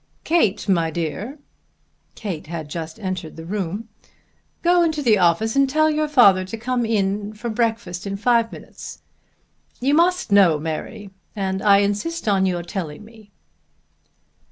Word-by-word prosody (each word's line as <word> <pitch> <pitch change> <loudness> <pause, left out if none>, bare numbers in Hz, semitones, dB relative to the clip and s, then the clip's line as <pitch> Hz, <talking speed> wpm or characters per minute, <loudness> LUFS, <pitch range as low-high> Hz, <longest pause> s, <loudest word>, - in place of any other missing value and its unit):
Kate, 310 - +1
my 170 -4 +2
dear," 170 - -4 0.8
Kate 185 -9 -5
had 160 -2 -5
just 160 +3 -6
entered 185 -5 -5
the 160 - -9
room, 200 +3 -4 0.8
"go 350 0 +4
into 320 -3 +1
the 220 -5 +4
office 180 +6 +2
and 275 -1 +3
tell 310 +2 +3
your 305 0 0
father 205 -11 +5
to 190 +5 -6
come 240 0 -1
into 210 +2 -1
breakfast 215 -5 -2
in 200 0 -3
five 230 +1 +2
minutes. - - -10 0.8
You 270 +3 +1
must 350 - +2
know, 190 -6 +6
Mary, 160 +6 -6 0.2
and 190 -1 -2
I 200 -1 +5
insist 205 +10 -2
on 195 -2 +3
your 175 -2 -2
telling 175 -1 -6
me." 220 -2 -17
205 Hz, 145 wpm, -22 LUFS, 185-240 Hz, 0.8 s, know